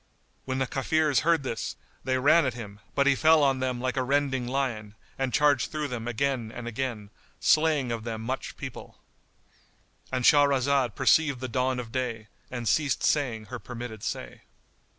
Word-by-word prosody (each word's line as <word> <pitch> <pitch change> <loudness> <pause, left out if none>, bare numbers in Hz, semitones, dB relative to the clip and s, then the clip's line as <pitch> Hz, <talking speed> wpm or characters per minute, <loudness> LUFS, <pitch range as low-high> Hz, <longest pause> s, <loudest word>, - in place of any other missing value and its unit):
When 130 0 -2
the 130 - +1
Kafirs 145 +1 +1
heard 165 -2 +2
this, 115 -3 -4 0.3
they 130 0 0
ran 145 +6 +5
at 125 - -2
him, 105 -4 -9 0.2
but 140 - +3
he 140 - +5
fell 155 +2 +5
on 135 -2 +2
them 130 -1 -1
like 130 +2 -2
a - - +2
rending 135 -1 0
lion 120 -6 -2 0.2
and 135 -1 -2
charged 145 -3 +3
through 150 -2 -2
them 120 -2 -5
again 120 -1 -1
and 120 0 -7
again, 115 -4 -4 0.3
slaying 155 -5 +3
of 115 -1 -3
them 110 -1 -5
much 130 +3 -4
people;——And 130 -2 -10
Shahrazad 140 -4 +4
perceived 140 0 +3
the 130 - -4
dawn 130 +1 0
of 115 -2 -7
day 115 -4 -3 0.2
and 120 -2 -5
ceased 145 0 +1
saying 120 -7 +1
her 125 - -4
permitted 120 -3 -7
say. - - -5
130 Hz, 170 wpm, -27 LUFS, 120-140 Hz, 0.3 s, ran